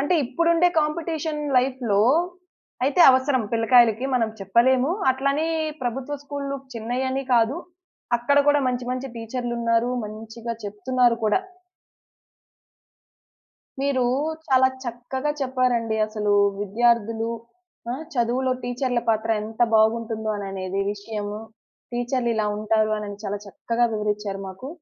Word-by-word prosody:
అంటే 290 +6 +1
ఇప్పుడుండే 335 +6 +3
కాంపిటీషన్ 310 0 -2 0.2
లైఫ్‌లో 250 -5 +1 0.8
అయితే, 285 +6 +2
అవసరం 260 -1 +2
పిల్లకాయలకి 230 0 +4
మనం 225 -3 +2
చెప్పలేము. 250 +8 +3 0.2
అట్లనే 275 +4 0 0.4
ప్రభుత్వ 255 +4 -3
స్కూల్లు 280 -1 -4 0.2
చిన్నయని 255 +4 -2
కాదు. 235 +5 +3 0.6
అక్కడ 260 +4 +2
గూడా 290 0 +5
మంచి 250 0 -2
మంచి 255 +1 -3
టీచర్లున్నారు. 235 0 -1
మంచిగా 225 +2 -7
చెప్తున్నారు 240 +4 +1
కూడా. 215 - +3 2.4
మీరు 275 -2 +1 0.4
చాలా 260 -1 +5 0.2
చక్కగా 245 +4 -3
చెప్పారండి. 250 -4 0
అసలు 210 -1 -1 0.3
విద్యార్థులు 225 +1 +1 0.6
ఆ! - - 0 0.2
చదువులో 250 +2 +1
టీచర్ల 245 0 -1
పాత్ర 225 0 +1
ఎంత 220 +2 -9
బాగుంటుందో 220 0 +2
అననేది 195 -1 -4
విషయము. 205 0 -5 0.5
టీచర్లిలా 240 -3 0
ఉంటారు 215 0 +1
అనని 205 -1 -6
చాలా 205 0 -2
చక్కగా 230 +4 -1
వివరిచ్చారు 210 -2 -2
మాకు. 195 +8 -8
240 Hz, 105 wpm, -24 LUFS, 220-260 Hz, 2.4 s, గూడా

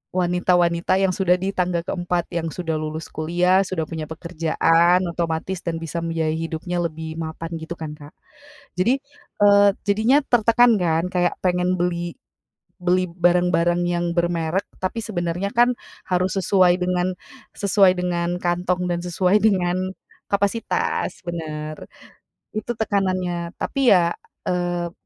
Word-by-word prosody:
wanita-wanita 180 0 +2
yang 195 -1 +2
sudah 180 -1 +2
di 190 +2 -2
tangga 180 -2 -1
keempat 175 -1 -2
yang 170 -1 -2
sudah 165 -3 -3
lulus 155 +1 -5
kuliah, 175 +4 +2
sudah 170 -4 -2
punya 160 -2 -5
pekerjaan, 165 +1 +2
otomatis 170 +2 -2
dan 170 -1 -2
bisa 165 +1 -4
membiayai 165 -1 -1
hidupnya 165 +2 -3
lebih 160 0 -5
mapan 165 +1 -5
gitu 160 +2 -6
kan, 160 -3 -6
Kak. 145 -1 -14 0.6
Jadi, 245 +9 +2 0.4
eee, 205 0 +7 0.2
jadinya 225 +8 +4
tertekan 235 -1 +4
kan 165 +1 +1
kayak 175 -1 +2
pengen 180 0 +1
beli 175 -1 -1 0.7
beli 180 +1 +1
barang-barang 175 0 +2
yang 175 0 0
bermerk 170 +1 0 0.2
tapi 185 +5 -2
sebenarnya 180 -1 -2
kan, 245 +1 +3 0.3
harus 185 +1 0
sesuai 185 -2 +3
dengan 180 0 0 0.4
sesuai 200 -1 +4
dengan 175 -1 -1
kantong 180 +1 0
dan 170 - -1
sesuai 180 +2 +1
dengan 185 -4 +2 0.5
kapasitas 200 +3 -1
bener. 155 -2 -4 0.8
Itu 240 +2 -3
tekanannya, 185 -5 -1
tapi 275 -3 +2
ya, 170 -1 +3 0.4
eee, 175 -1 -1
175 Hz, 130 wpm, -22 LUFS, 170-185 Hz, 0.8 s, eee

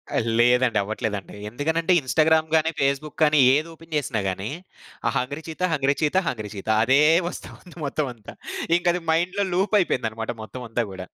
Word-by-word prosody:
ఆ! - - +2 0.2
లేదండి. 125 -1 +4
అవ్వట్లేదండి. 105 -1 -4
ఎందుకనంటే, 160 - 0
ఇన్‌స్టాగ్రామ్ 155 +4 +2
గానీ, 160 0 +3
ఫేస్‌బుక్ 140 +2 -1
గానీ, 150 -1 +4 0.2
ఏదోపెన్ 165 +1 -5
జేసినా 135 -6 -1
గానీ, 95 +3 -4 0.6
ఆ - - +3
'hungry 140 +5 -3
cheetah 160 +2 -8
hungry 140 -1 +1
cheetah 155 +5 +1
hungry 110 -4 -3
cheetah' 100 +2 -3
అదే 135 +5 +4 0.3
వస్తా - - -9
ఉంది 180 - -16
మొత్తవంతా. 130 -7 -4 0.4
ఇంకది 175 0 0
మైండ్‌లో 180 +5 +1
లూపయిపోయిందనమాట 130 - 0
మొత్తమంతా 120 0 -4
గూడా. 95 -1 -7
140 Hz, 145 wpm, -24 LUFS, 115-160 Hz, 0.6 s, లేదండి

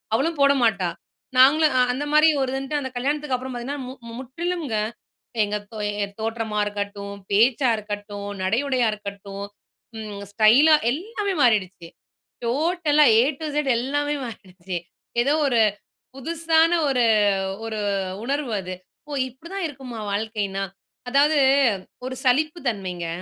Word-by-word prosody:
அவளும் 315 +5 0
போடமாட்டா. 235 -10 +3 0.5
நாங்களும் 295 +3 +6
அ - - +6
அந்த 275 - -3
மாரி 305 +1 +7
ஒரு 260 -1 0
இருன்ட்டு 270 +2 -2
அந்த 265 -2 -4
கல்யாணத்துக்கு 285 +1 -1
அப்புறம் 255 +1 -5
பார்த்தீங்கன்னா, 270 +4 -4
மு 260 - -7 0.3
முற்றிலும்ங்க. 295 -1 -3 0.7
எங்க 205 0 -2 0.2
தோ 220 - -8 0.3
என் 200 0 -7
தோற்றமா 225 -1 -2
இருக்கட்டும், 205 -1 -4 0.2
பேச்சா 240 +5 +4
இருக்கட்டும், 205 -1 -6 0.2
நடை 215 +5 +2
உடையா 255 -4 +2
இருக்கட்டும், 200 -1 -7 0.5
ம் 210 -2 -7
ஸ்டைலா 240 +10 +6 0.2
எல்லாமே 400 - -3
மாறிடுச்சு. 195 -8 +2 0.6
டோட்டலா 300 +3 +3
'ஏ - - +7 0.2
டூ 320 - -4
இசட்' 295 -1 0
எல்லாமே 290 +4 -1
மாறிடுச்சு. 185 -5 -7 0.4
ஏதோ 275 +4 +2
ஒரு 240 -4 +2 0.6
புதுசான 325 +3 +2 0.2
ஒரு 250 -3 +2 0.6
ஒரு 220 -1 -3 0.4
உணர்வு 280 -2 -2
அது. 185 0 -6 0.3
"ஓ! 295 - -7 0.2
இப்படி 265 +7 -14
தான் 390 -2 -2
இருக்குமா 255 -5 -8
வாழ்க்கைன்னா?". 205 -2 -2 0.5
அதாவது 290 +3 +4 0.7
ஒரு 260 - -5
சலிப்பு 305 +6 +2
தன்மைங்க. 185 -5 -3
250 Hz, 130 wpm, -23 LUFS, 210-290 Hz, 0.7 s, மாரி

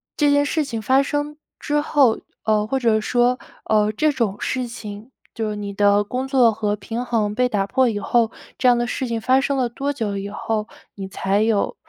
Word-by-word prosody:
这 295 -1 +3
件 285 0 +3
事 310 +1 0
情 230 -5 -4
发 265 +5 +3
生 290 +1 -2 0.2
之 295 0 0
后， 275 -7 +3 0.3
呃， 215 -1 +2
或 265 +4 -1
者 220 -3 +2
说， 245 +2 +2 0.3
呃， 215 -1 +2
这 305 +9 +1
种 230 -8 -1
事 255 -1 -2
情， 225 -1 -9 0.2
就 225 -2 -2
是 210 - -4
你 200 -1 -5
的 205 0 +3
工 250 +5 -3
作 255 -5 +4
和 210 -1 -1
平 225 +4 -4
衡 215 -4 -1
被 250 0 +2
打 200 -4 0
破 260 +3 +2
以 210 -2 -2
后， 230 +1 +1 0.3
这 250 - +4
样 245 - +4
的 240 0 0
事 260 - -2
情 230 -1 -1
发 260 +3 +3
生 275 0 -1
了 250 -2 +1
多 275 +4 -3
久 215 -7 -3
以 200 +1 -5
后。 215 +1 -3 0.3
你 195 - -6
才 195 +2 0
有， 220 -2 +1
230 Hz, 230 characters per minute, -21 LUFS, 210-260 Hz, 0.3 s, 作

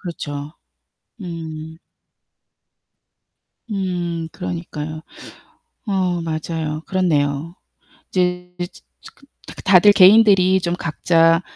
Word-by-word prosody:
그렇죠. 145 -4 -6 0.7
음. 160 -3 -7 1.9
음 175 -4 -3
그러니까요. 150 - -6 0.8
어 185 -4 0
맞아요. 160 -1 -4
그렇네요. 160 -3 0 0.6
이제 180 -1 -1
즈 175 0 -7 0.2
츠 - - -14
그 275 - -23 0.2
다 - - -10
그 - - -10
다들 195 +2 +6
개인들이 190 -2 +6
좀 175 0 -1
각자 165 0 +2
170 Hz, 175 characters per minute, -20 LUFS, 155-185 Hz, 1.9 s, 다들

